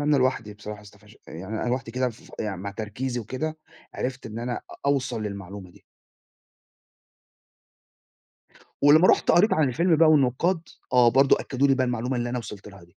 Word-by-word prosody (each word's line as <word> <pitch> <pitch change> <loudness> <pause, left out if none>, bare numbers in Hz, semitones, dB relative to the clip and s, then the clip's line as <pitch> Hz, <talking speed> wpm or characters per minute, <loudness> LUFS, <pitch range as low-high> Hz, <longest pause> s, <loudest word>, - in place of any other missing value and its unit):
أ - - -2
أنا 150 0 +3
لوحدي 130 -5 0
بصراحة 105 0 -8
استفش 105 +1 -18
يعني 95 +7 -7
أنا - - -2
لوحدي 125 -1 -2
كده 125 +2 0
ف 115 - -14
يعني 105 -3 -3
مع 100 +3 -6
تركيزي 120 +4 -4
وكده، 155 +8 -4 0.4
عرفت 130 0 -4
إن 110 0 -7
أنا 120 +1 -3
أ - - -9
أوصل 130 -5 0
للمعلومة 100 -2 -7
دي. - - -21 3.0
ولمّا 155 +5 +6
رُحت - - +4
قريت 205 +6 +4
عن 155 -3 +3
الفيلم 165 +6 +2
بقى 160 0 +5
والنقاد، 155 +5 +2 0.3
آه، 125 -1 +6
برضه 135 +3 +4
أكدّوا 135 +1 0
لي 135 - +5
بقى 130 -1 +1
المعلومة 125 +1 -2
اللي 120 0 -2
أنا 125 - -2
وصِلت 105 -3 -9
لها 100 -1 -14
دي. 85 - -17
125 Hz, 180 wpm, -25 LUFS, 105-135 Hz, 3.0 s, ولمّا